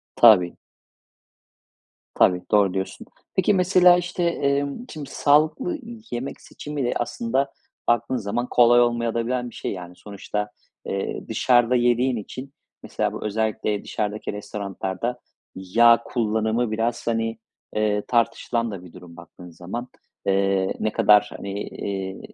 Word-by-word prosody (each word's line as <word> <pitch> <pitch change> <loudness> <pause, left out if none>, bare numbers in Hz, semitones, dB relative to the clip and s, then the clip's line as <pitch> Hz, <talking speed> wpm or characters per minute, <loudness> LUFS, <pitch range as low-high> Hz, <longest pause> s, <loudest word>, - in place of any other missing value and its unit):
Tabii. 95 -7 +6 1.6
Tabii, 90 -1 +3
doğru 100 -3 +4
diyorsun. 95 0 -4 0.3
Peki, 190 +2 +3
mesela, 180 -1 +6
işte, 175 0 -3
emm, 140 -2 0
şimdi 150 -3 -8
sağlıklı 155 - +2 0.3
yemek 125 +3 -5
seçimi 145 -3 -6
de 120 - 0
aslında, 130 +3 -1 0.4
baktığın 120 +2 +2
zaman, 120 +2 -2
kolay 120 0 +6
olmayabilen 120 +1 0
de - - -7
bir - - -18
şey - - -4
yani. 90 -2 -8
Sonuçta, 105 0 -5 0.4
eee, 95 0 -4
dışarıda 125 0 +3
yediğin 120 +1 +2
için 130 +6 -7 0.3
mesela - - -2
bu - - -7
özellikle 110 -1 -1
dışarıdaki 105 0 -3
restoranlarda 100 +2 -4 0.4
yağ 115 +5 +4
kullanımı 110 0 0
biraz, 115 +2 -2
hani, 115 -1 -1 0.4
eee, 105 -1 +1
tartışılan 115 -1 0
da 95 -3 -7
bir 85 - -13
durum 85 -1 -13
baktığın 90 +1 -13
zaman. 95 +9 -6 0.4
Eee, 95 -1 +1
ne 110 - 0
kadar, 105 0 +5
hani, 100 0 -6 0.2
eee, 95 -1 -5
115 Hz, 130 wpm, -23 LUFS, 100-125 Hz, 1.6 s, Tabii